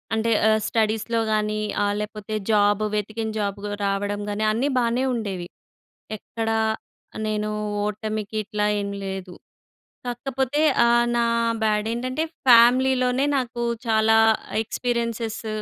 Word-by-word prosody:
అంటే 225 +1 0 0.2
ఆహ్, 220 0 +3
స్టడీస్‍లో 225 +1 0
గాని, 215 0 0 0.2
ఆహ్, 205 0 +1
లేపోతే 210 0 -5 0.2
జాబు 205 0 +3
వెతికిన 215 +2 -3
జాబ్ 200 -1 -2
గ్ - - -3 0.2
రావడం 205 +1 -1
గాని 210 +1 -1
అన్నీ 240 +6 0
బానే 240 +2 +1
ఉండేవి. 190 -6 -4 0.7
ఎక్కడ 225 +1 -4 0.8
నేను 215 0 -1 0.3
ఓటమికిట్లా 215 0 -3 0.2
ఏం 200 - -3 0.2
లేదు. 190 -1 -5 0.7
కాకపోతే 265 +3 -1 0.3
ఆహ్, 240 0 +4
నా 235 - +2 0.4
బ్యాడేంటంటే 230 +7 -1 0.2
ఫ్యామిలీలోనే, 250 +2 +5
నాకు 240 -2 -3 0.2
చాలా 220 0 +4 0.5
ఎక్స్‌పీరియెన్సెస్‌ 230 -1 -3
220 Hz, 110 wpm, -23 LUFS, 210-235 Hz, 0.8 s, ఫ్యామిలీలోనే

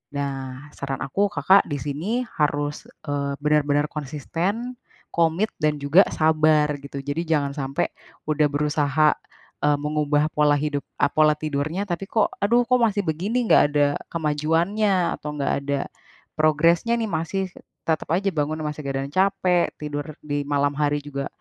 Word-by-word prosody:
Nah, 135 -1 -4
saran 135 -1 -4
aku, 200 +9 +1
Kakak 195 +1 +5
di 145 - -1
sini 145 - -4 0.3
harus, 145 0 0 0.2
eee, 140 -1 -1
benar-benar 150 0 +2
konsisten, 170 - -3 0.4
komit, 170 +6 +2
dan 150 -1 +2
juga 160 +8 +6
sabar, 155 -1 +3 0.2
gitu. 140 0 -6
Jadi, 145 +4 -2
jangan 145 -3 +1
sampai 135 0 -1 0.4
udah 150 0 +3
berusaha, 150 +1 +2 0.6
eee, 145 -1 +3
mengubah 150 0 +1
pola 150 -1 +4
hidup 145 -1 -2 0.2
eee, 145 - +4
pola 155 0 +5
tidurnya, 155 +5 -2
tapi 175 +3 -2
kok, 220 - +2
"Aduh, 235 +4 +4
kok 250 - +5
masih 215 -3 +2
begini, 200 +10 -1
enggak - - +7
ada 145 -1 +4 0.3
kemajuannya?" 170 +5 +1
Atau, 150 - -6
enggak 140 - 0
ada 140 0 0 0.6
progresnya 165 +8 +3
nih, 220 -2 -2
masih 165 +4 -1 0.4
tetap 160 -1 0
aja 195 +2 +1
bangunnya, 155 +1 -1
masih 150 0 -7
badan 135 0 -2
capek, 185 -1 +2
tidur 145 -1 -4 0.2
di 145 -1 -1
malam 145 0 +1
hari 145 0 +1
juga 140 -1 -5
150 Hz, 150 wpm, -23 LUFS, 145-170 Hz, 0.6 s, enggak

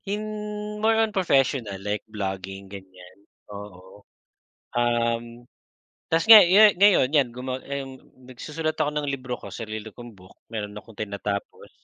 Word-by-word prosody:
In 210 0 -5
more 220 +1 +3
on 220 -1 +1
professional 135 - +1
like 105 +1 -3
vlogging 95 -2 -5
ganyan 95 -1 -13 0.4
oo. 100 -1 -11 0.7
Um, 120 0 -1 0.6
'tas 165 +4 +1
nga 220 -1 +11
yan 205 +4 +6
ngayon 180 -8 +4
yan 140 -5 +3
guma 130 +2 -6
ayung 135 -1 -7 0.2
nagsusulat 155 +5 -4
ako 150 -2 0
ng 150 -1 -3
libro 130 -3 -4
ko - - -10
sarili 110 -2 -7
kong 120 -4 -12
book 95 +1 -17 0.2
meron 105 -2 -5
akong 105 +1 -12
tinatapos. 100 -1 -5
120 Hz, 135 wpm, -24 LUFS, 105-160 Hz, 0.7 s, nga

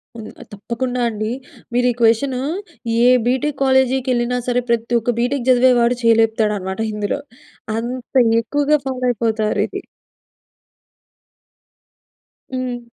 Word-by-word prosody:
హ్మ్. 220 -2 -8 0.2
తప్పకుండా 245 +4 -3
అండి. 215 +1 -3 0.4
మీరు 245 +1 +2
ఈ - - -3
క్వెషనూ 240 +3 +2 0.7
ఏ - - +6 0.2
బీటెక్ 265 +4 0
కాలేజీకెళ్ళినా 260 -2 +1
సరే 245 0 +1
ప్రతి 235 0 0
ఒక్క 240 +2 -1
బీటెక్ 250 +1 -1
చదివేవాడు 245 -1 +4
చేయి 230 -1 +5
లేపుతాడనమాట 210 -4 -1
ఇందులో, 210 +6 -2 0.6
అంత 245 +2 -5 0.3
ఎక్కువగా 290 +5 +1
ఫాలో 255 -1 -4
అయిపోతారు 220 -2 0
ఇది. - - -7 2.7
హ్మ్. 250 -2 -4
245 Hz, 105 wpm, -19 LUFS, 225-255 Hz, 2.7 s, ఏ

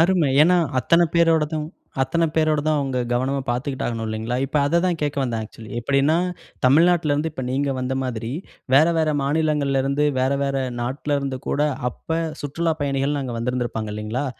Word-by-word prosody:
அருமை. 170 -3 +3
ஏன்னா, 180 +3 +5 0.2
அத்தன 170 +6 +4
பேரோடதும் 160 -2 +2 0.4
அத்தன 170 +5 0
பேரோட 155 -1 +3
தான் 155 -1 +2
அவங்க 135 -2 -1
கவனமா 130 +3 0
பார்த்துக்கிட்டு 130 +2 -2
ஆகணும் 115 -2 -3
இல்லைங்களா? 110 +3 -2
இப்ப 140 - -3
அத 170 +4 +2
தான் 175 -3 0
கேட்க 145 -1 -1
வந்தேன் 115 -4 -2
ஆக்சுவலி. 110 +1 -12
எப்படின்னா 140 +5 +2 0.5
தமிழ்நாட்டில 160 +3 +4
இருந்து 150 +3 0
இப்ப 130 - -5
நீங்க 140 +2 0
வந்த 130 +1 -2
மாதிரி. 115 -2 -4 0.4
வேற, 155 +4 +7
வேற 160 -1 +2
மாநிலங்கள்ல 145 -2 +1
இருந்து 140 +2 +1
வேற, 130 +1 +2
வேற 140 0 -1 0.2
நாட்டுல 140 +4 -1
இருந்து 135 -2 -3
கூட, 145 - 0 0.3
அப்ப 160 +6 -4 0.2
சுற்றுலாப் 160 +2 -2
பயணிகள்னு 140 +1 0
அங்கு 120 -3 -4
வந்திருந்திருப்பாங்க 115 -3 -2
இல்லைங்களா? 110 +6 -3
140 Hz, 165 wpm, -22 LUFS, 125-155 Hz, 0.5 s, வேற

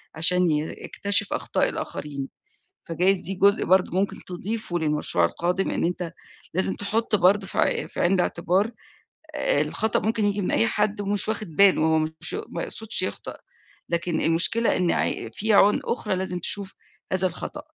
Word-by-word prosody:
عشان 180 +1 +4
ي 150 - +2 0.3
يكتشف 200 +1 0
أخطاء - - 0
الآخرين، 140 -2 -5 0.6
فجايز 180 +3 +1
دي 195 - -4
جزء 200 +2 +3
برضه 185 0 +3
ممكن 200 - 0
تضيفه 185 0 -4
للمشروع 150 - +1
القادم، 180 - -1
إن - - -1
أنت 175 -1 -2 0.4
لازم 190 +2 +1
تحط 215 +2 0
برضه 195 +1 +3
في - - -4
ع - - +1
في - - -8
عين 175 - +3
الاعتبار، 185 +3 +1 0.6
آآ - - +1
الخطأ 220 -1 0
ممكن 220 -1 0
ييجي 205 0 0
من 185 - -1
أي 115 +1 +3
حد، 210 - 0
ومش 205 0 -1
واخد 215 -8 -4
باله، 195 -5 +5
هو 160 0 +3
مش 160 +1 -4
ما - - -4
يقصدش - - -3
يخطأ، - - -5 0.5
لكن 170 -1 -1
المشكلة 175 +8 +2
إن 180 -2 +2
ع 115 - -1
في 220 +1 0
عيون 205 +1 +5
أخرى 210 -5 -1
لازم 180 -1 -3
تشوف 195 +2 -1 0.4
هذا 185 0 +2
الخطأ. 295 - -7
185 Hz, 165 wpm, -24 LUFS, 170-205 Hz, 0.6 s, باله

